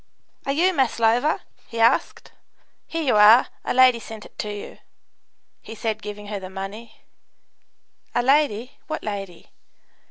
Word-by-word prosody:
"Are - - +1
you 350 +6 +2
Maslova?" 245 0 +2 0.3
he 230 - -7
asked. 230 +3 +1 0.6
"Here 330 0 -3
you 250 -7 +2
are; 215 +4 +7
a - - -2
lady 255 -2 +5
sent 220 -2 -10
it - - -7
you," 205 -1 -7 0.8
he 225 - -10
said, 220 0 -3
giving 210 0 -8
her 205 -1 -5
the 185 -1 -8
money. 205 +4 -8 1.1
"A 240 - +2
lady 260 -3 +1
what 310 - -4
lady?" 195 -4 -6
225 Hz, 135 wpm, -23 LUFS, 210-255 Hz, 1.1 s, are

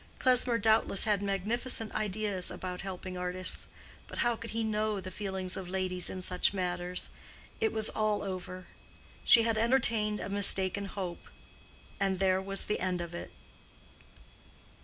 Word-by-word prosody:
Klesmer 250 -2 +4
doubtless 220 -2 +4
had 210 -2 +2
magnificent 215 +4 -1
ideas 210 -2 -1
about 180 -1 -5
helping 185 -1 -6
artists; 180 +1 +1 0.4
but - - -9
how 240 -1 +2
could 230 +1 -8
he 225 +1 -1
know 215 -1 0
the 185 0 -7
feelings 190 -3 -2
of 185 -2 -6
ladies 185 -1 -1
in 185 -1 -6
such 180 +2 +1
matters? 180 -1 -2 0.5
It 445 -1 +2
was 220 0 +2
all 215 -1 0
over: 185 -1 -6 0.6
she 230 - +7
had 225 -1 +1
entertained 225 -3 +2
a - - -4
mistaken 200 -1 +1
hope; 190 -3 -6 0.7
and 195 -1 +1
there 190 0 +2
was 195 0 0
an 210 - 0
end 180 -1 -1
of 170 0 -5
it. 175 - -6
195 Hz, 150 wpm, -31 LUFS, 185-215 Hz, 0.7 s, she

